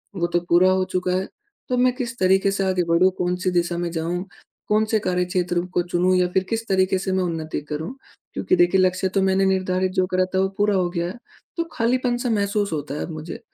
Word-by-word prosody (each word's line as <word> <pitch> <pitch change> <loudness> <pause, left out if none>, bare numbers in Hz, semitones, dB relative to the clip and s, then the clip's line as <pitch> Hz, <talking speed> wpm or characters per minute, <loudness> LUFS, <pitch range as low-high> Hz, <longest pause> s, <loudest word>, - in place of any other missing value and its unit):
वो 170 -2 0
तो 175 - +1
पूरा 180 +2 +5
हो 185 0 +1
चुका 180 0 0
है, 185 +1 -1 0.4
तो 250 - +1
मैं 250 0 +3
किस 240 -3 -4
तरीके 190 +1 +3
से 195 0 -1
आगे 185 -1 +1
बढ़ूँ, 175 +3 +5
कौन-सी 180 +1 -1
दिशा 175 -1 0
में 175 -1 -2
जाऊँ, 170 +2 -2 0.5
कौन-से 215 +1 +2
कार्यक्षेत्र 180 -1 0
को 175 - +2
चुनूँ 180 +1 +1
या 180 - +3
फिर 190 0 +2
किस 225 0 -2
तरीके 190 0 +2
से 190 0 -3
मैं 185 0 +1
उन्नति 160 -3 -3
करूँ? 155 - -4 0.4
क्योंकि 370 - +1
देखिए, 350 - +4
लक्ष्य 185 0 +1
तो 195 - +3
मैंने 190 0 +2
निर्धारित 185 -1 +1
जो 185 -1 +2
करा 185 0 +1
था, - - +3
वो 190 0 +2
पूरा 205 -1 +2
हो 180 -2 +1
गया 170 -1 -2
है, 190 +7 -7 0.4
तो 335 - +1
खालीपन 245 +1 +1
सा 245 0 -2
महसूस 205 -1 0
होता 145 -2 -4
है - - -4
अब - - -8
मुझे। 155 +1 -7
185 Hz, 225 wpm, -22 LUFS, 175-200 Hz, 0.5 s, पूरा